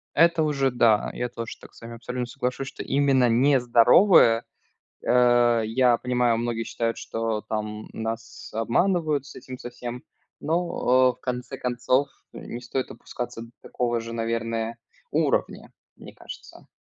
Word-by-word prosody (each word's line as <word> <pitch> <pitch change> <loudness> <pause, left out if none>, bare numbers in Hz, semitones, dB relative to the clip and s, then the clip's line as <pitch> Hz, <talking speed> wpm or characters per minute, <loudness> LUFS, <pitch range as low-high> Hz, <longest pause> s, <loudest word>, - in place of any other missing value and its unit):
Это 170 0 +4
уже 135 -3 +1
да, 115 -3 +3
я 125 - -3
тоже 115 -1 -7
так - - -15
с - - -18
вами 115 0 -8
абсолютно 125 +1 -4
соглашусь, 125 +2 -4
что - - -7
именно 135 -3 +3
не 130 +4 +4
здоровое. 120 - +5 0.6
Э, 120 -2 +4
я 120 +2 +3
понимаю, 125 -2 +1
многие 115 -1 -2
считают, 115 0 -2
что 115 -1 -3
там 105 0 -5
нас 115 0 -6
обманывают 150 - +1
с 145 - -12
этим 130 0 -9
со 120 - -8
всем, 120 +1 -7 0.4
но, 130 -7 +2
э, - - -25
в - - -36
конце 125 +1 -4
концов 125 +2 0 0.2
не 120 - -8
стоит 125 +2 -3
опускаться 120 -2 -7
до 115 - -11
такого 120 -1 -2
же, 115 0 -7
наверное, 115 0 -2 0.3
уровня, - - 0 0.2
мне - - -13
кажется. - - -12
120 Hz, 150 wpm, -25 LUFS, 115-130 Hz, 0.6 s, здоровое